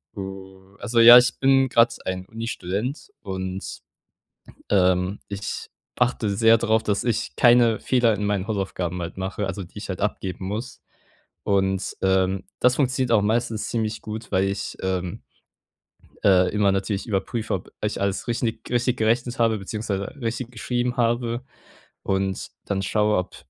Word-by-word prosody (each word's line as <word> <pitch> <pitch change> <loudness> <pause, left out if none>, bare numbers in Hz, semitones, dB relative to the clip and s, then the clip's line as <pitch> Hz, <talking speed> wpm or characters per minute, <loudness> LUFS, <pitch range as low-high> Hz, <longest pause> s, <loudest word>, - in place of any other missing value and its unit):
Oh, 95 0 -9
also, 115 +1 0
ja, 120 +1 +11
ich 125 +1 +3
bin 135 -1 +4
grad 115 0 +4
ein 95 0 -3
Unistudent 115 - -4
und, 95 -1 -5 0.9
ähm, 90 0 +2
ich 100 0 -5 0.3
achte 120 -3 +1
sehr 115 +1 +5
drauf, 110 -1 +1
dass 100 -1 0
ich 120 -1 -1
keine 120 -2 +5
Fehler 120 -3 +2
in 105 - -3
meinen 100 -2 -1
Hausaufgaben 95 -4 -2
halt 85 - -6
mache, 95 +2 -3
also, 95 0 -4
die 90 - -14
ich 105 - -7
halt 95 +1 -4
abgeben 95 -2 -3
muss. 110 +5 -5 0.6
Und, 95 -1 0
ähm, 95 0 +1 0.2
das 125 0 +4
funktioniert 130 -3 0
auch 110 -3 +5
meistens 110 +1 -1
ziemlich 110 -1 -2
gut, 110 +1 -7
weil 95 +1 +2
ich, 100 0 -3
ähm, 90 -2 -2 1.0
äh, 90 -2 +5
immer 105 -2 +3
natürlich 100 +2 -2
überprüfe, 110 +1 -2
ob - - -4
ich - - -1
alles 100 +4 -1
richtig 115 -1 -1
richtig 125 +1 +1
gerechnet 120 +2 +1
habe, 115 -2 +2
beziehungsweise 100 0 -3 0.2
richtig 120 +1 -3
geschrieben 120 +1 -2
habe. 120 +1 0 0.6
Und 95 -1 -1 0.2
dann 95 -1 -1
schaue, 105 +1 +1
ob 90 - -3
105 Hz, 150 wpm, -24 LUFS, 95-115 Hz, 1.0 s, ja